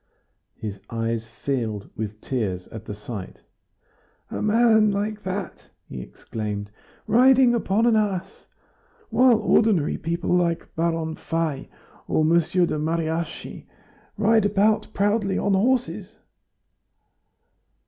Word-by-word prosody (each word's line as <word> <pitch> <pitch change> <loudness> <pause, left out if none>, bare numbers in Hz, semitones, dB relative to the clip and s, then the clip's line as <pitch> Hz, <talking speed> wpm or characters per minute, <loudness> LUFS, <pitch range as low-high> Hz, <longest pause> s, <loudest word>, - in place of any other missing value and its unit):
His 100 -2 -6
eyes 115 0 -2
filled 115 -4 -3
with 105 0 -5
tears 100 -9 -2
at 110 -1 -9
the 105 - -6
sight. 105 -2 -8 0.9
"A - - -3
man 220 0 +4
like 205 +1 -2
that," 190 -1 -5 0.2
he 65 - -7
exclaimed, 105 - -6 0.3
"riding 250 +2 +5
upon 225 -1 +1
an 235 -2 +4
ass! 205 -4 -2 0.6
While 250 -2 +5
ordinary 210 -6 +2
people 170 +2 -1
like 170 -2 -1
Baron 165 -1 -1
Fay 165 -4 -2 0.4
or 155 - +2
Mr. 170 +2 +3
de 155 - -2
Mariassy 165 +1 -3 0.5
ride 220 0 +4
about 210 +2 +2
proudly 205 -1 +1
on 200 - +1
horses." 220 -1 0
170 Hz, 110 wpm, -24 LUFS, -, 0.9 s, riding